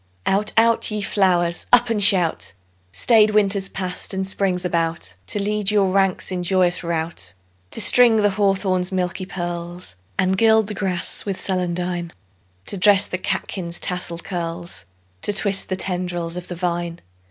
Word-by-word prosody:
Out, 205 +2 +2
out, 230 0 +4
ye 210 -1 -3
flowers! 175 -4 +1
Up 245 -1 +5
and 215 -2 0
shout! 190 -5 +2 0.4
Staid 215 - +4
Winter's 200 -2 +2
passed 185 +1 -4
and 190 0 -1
Spring's 190 -2 -1
about 165 - -1
To - - 0
lead 210 0 -1
your 200 -3 +2
ranks 195 -1 +1
in 180 -1 -2
joyous 180 -1 +1
rout; 165 - -3 0.4
To - - -1
string 230 +3 +6
the 205 -2 +3
hawthorn's 190 -2 +1
milky 185 0 -2
pearls, 175 - -6 0.2
And 185 0 +1
gild 220 -1 +4
the 210 - -5
grass 190 -3 -2
with 195 -2 -3
celandine; 180 -2 -2 0.6
To 200 - 0
dress 200 +1 +5
the 185 - -4
catkins' 175 -2 -4
tasselled 175 -2 -4
curls, 170 - -5 0.4
To - - +2
twist 200 -1 +1
the 185 - 0
tendrils 175 -2 -3
of 180 0 -6
the 175 - -5
vine. 175 -1 -3
185 Hz, 155 wpm, -21 LUFS, 175-200 Hz, 0.6 s, string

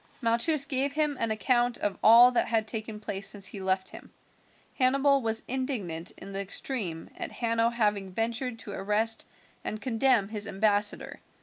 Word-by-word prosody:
Malchus 250 +5 +3
gave 275 -1 0
him 300 -1 0
an 230 - -1
account 240 +2 +1
of 205 - -2
all 235 +3 +7
that 245 - 0
had 220 -2 0
taken 220 -1 -4
place 195 -2 -1
since 200 -2 +1
he 195 0 -1
left 190 0 0
him. - - -13 0.7
Hannibal 275 +2 +3
was 225 -1 -1
indignant 220 - -2
in 195 - -10
the 195 - -2
extreme 195 -4 -1
at - - -5
Hanno 230 -1 0
having 210 -5 -1
ventured 230 +4 -3
to 215 - -9
arrest 210 +3 -1 0.4
and 215 - -4
condemn 235 -3 +1
his 210 -1 -1
ambassador. 205 +1 -1
225 Hz, 165 wpm, -27 LUFS, 205-250 Hz, 0.7 s, all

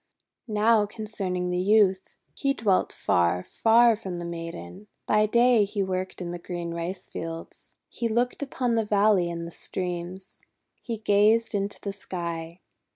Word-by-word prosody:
Now 215 0 +3
concerning 195 -5 -3
the 180 - 0
Youth. 195 -1 +3 0.2
He 275 0 0
dwelt 200 -4 +1
far, 90 0 +1
far 230 +1 +5
from 190 -4 -6
the 175 - -5
Maiden. 165 - -7 0.2
By 215 0 +3
day 235 0 +4
he 200 0 -1
worked 185 0 -3
in 175 -1 -4
the 175 - -5
green 170 -1 -5
rice 175 +3 -4
fields. 165 0 -8
He 235 - -3
looked 240 +4 0
upon 260 -3 -1
the 225 -1 +2
valley 205 -4 +3
and 170 0 -4
the 170 - -8
streams. 180 +2 -5 0.4
He 230 -2 -4
gazed 215 +2 +3
into 200 0 -2
the 200 - -5
sky. 170 -3 -6
195 Hz, 155 wpm, -26 LUFS, 175-220 Hz, 0.4 s, far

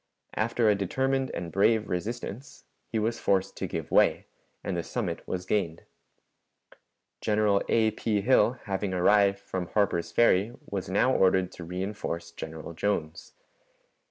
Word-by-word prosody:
After 115 +1 +1
a 105 - +6
determined 130 +7 0
and 85 -1 -5
brave 110 +2 +3
resistance, 115 +6 -5 0.3
he - - -1
was 115 +2 -1
forced 95 -1 +1
to - - -3
give - - -5
way, - - +4 0.4
and 95 - -2
the 85 - -1
summit 90 -2 -3
was 90 0 -3
gained. 85 -6 -1 1.4
General 105 -2 +2
A. 110 -1 +3
P. 105 -1 -1
Hill, 120 +1 +4
having 95 -1 -2
arrived 100 +2 +4
from 95 -2 -5
Harper's 90 -5 0
Ferry, 115 -1 +3
was 95 -2 -4
now 115 +7 +3
ordered 95 -2 +3
to 90 - -9
reënforce 90 -3 -4
General 80 +1 -7
Jones. 80 -4 -3
100 Hz, 140 wpm, -28 LUFS, 90-110 Hz, 1.4 s, a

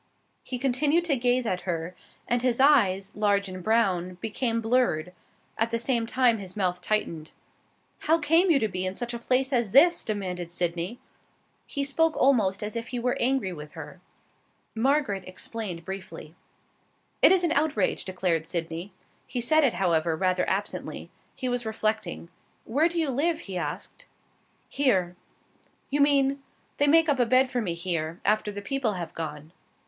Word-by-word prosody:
He 255 - -5
continued 285 +6 +1
to 305 -5 +2
gaze 245 0 +1
at 185 -5 -1
her, 175 -1 -4 0.3
and 240 0 +1
his 250 -1 +1
eyes, 200 -9 +3
large 205 -1 +1
and 185 -1 -7
brown, 185 -4 +1
became 225 +4 -2
blurred; 225 -8 +1 0.5
at 225 +1 +2
the 230 - 0
same 235 -1 0
time 240 -2 +2
his 190 0 -9
mouth 180 -2 -1
tightened. 170 -6 -2 0.7
"How 325 +2 +2
came 330 +4 +3
you 320 - +5
to 225 -5 +1
be 185 -2 -3
in 185 0 -2
such 240 +1 -4
a 235 - -4
place 260 +3 0
as 235 -5 0
this?" 340 +6 +6
demanded 180 -5 -4
Sydney. 175 +5 -2 0.7
He 280 - -2
spoke 315 +3 +1
almost 215 -8 +2
as 210 +2 -4
if 230 0 -4
he 250 - -4
were 245 +1 0
angry 250 -7 +1
with 150 -2 -10
her. - - -10 0.7
Margaret 245 -4 +1
explained 185 -2 -5
briefly. 185 -5 -8 0.9
"It - - +8
is 375 -1 +4
an 340 - +1
outrage," 290 - +1
declared 180 -4 -1
Sydney. 170 +2 -4 0.4
He 250 - -3
said 310 +6 +3
it, 255 -8 +2
however, 170 -3 +1
rather 185 +1 0
absently. 200 +2 -4 0.2
He 255 - -4
was 245 -1 -1
reflecting. 215 -6 -2 0.4
"Where 300 +8 +2
do 345 - -5
you 315 -4 +1
live?" 320 +5 0
he 195 - -7
asked. 175 - -5 0.6
"Here." 190 -11 +1 0.8
"You 290 +1 +1
mean 275 -1 +3 0.2
?" - - -40
"They 290 - +3
make 325 +2 +5
up 285 -3 +1
a 245 - +4
bed 255 +1 +3
for 245 - 0
me 175 -6 -2
here, 170 -1 -3
after 215 0 +1
the 205 0 -7
people 265 -3 -1
have 175 -3 -6
gone." 155 -1 -6
220 Hz, 170 wpm, -26 LUFS, 185-265 Hz, 0.9 s, It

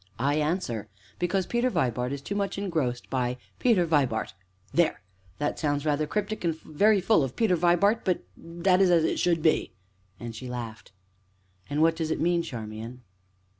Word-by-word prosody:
I 140 +5 +1
answer: 150 - -1 0.3
Because 180 +1 0
Peter 240 +1 +1
Vibart 125 - 0
is 140 0 -5
too 200 - -4
much 200 -1 -2
engrossed 160 -11 -2
by 125 -1 0 0.2
Peter 220 -8 +3
Vibart. 140 -8 +1 0.4
There! 170 -2 +2 0.4
that 145 0 -2
sounds 145 -1 0
rather 150 0 +1
cryptic 210 +2 -2
and 165 -2 -1
very 205 +7 +3
full 190 -4 +3
of 130 -2 -4
Peter 220 -6 +3
Vibart; 175 +6 +3
but 185 -2 0
that 175 +3 +1
is 190 - +5
as 170 -2 +4
it - - 0
should 170 -3 +1
be," 160 - +2 0.5
and 120 -1 -7
she 125 +2 -7
laughed. 115 -4 -7 0.8
"And 145 +2 +1
what 165 0 +4
does 160 -1 -2
it - - -1
mean, 175 0 +2
Charmian?" 115 -3 -7
160 Hz, 170 wpm, -27 LUFS, 130-180 Hz, 0.8 s, is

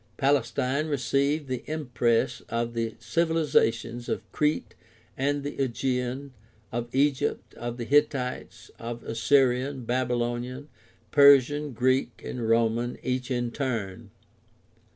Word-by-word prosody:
Palestine 135 +1 +1
received 140 +1 0
the 130 -2 -3
impress 125 -7 0
of 115 0 -2
the 115 -1 -2
civilizations 120 -6 +1
of - - -2
Crete 150 0 0 0.4
and 140 +1 0
the 145 -1 -2
Aegean, 130 +1 -2 0.4
of 120 +1 -3
Egypt, 140 +1 0
of 120 0 -5
the 120 - -4
Hittites, 140 -2 0
of 120 0 -6
Assyrian, 130 +2 +2
Babylonian, 125 +2 -2 0.4
Persian, 140 0 +5
Greek, 130 +3 +1
and 115 -3 -3
Roman, 115 +1 +1
each 125 0 -2
in 120 -2 -1
turn. 115 -9 -3
125 Hz, 110 wpm, -27 LUFS, 120-140 Hz, 0.4 s, Persian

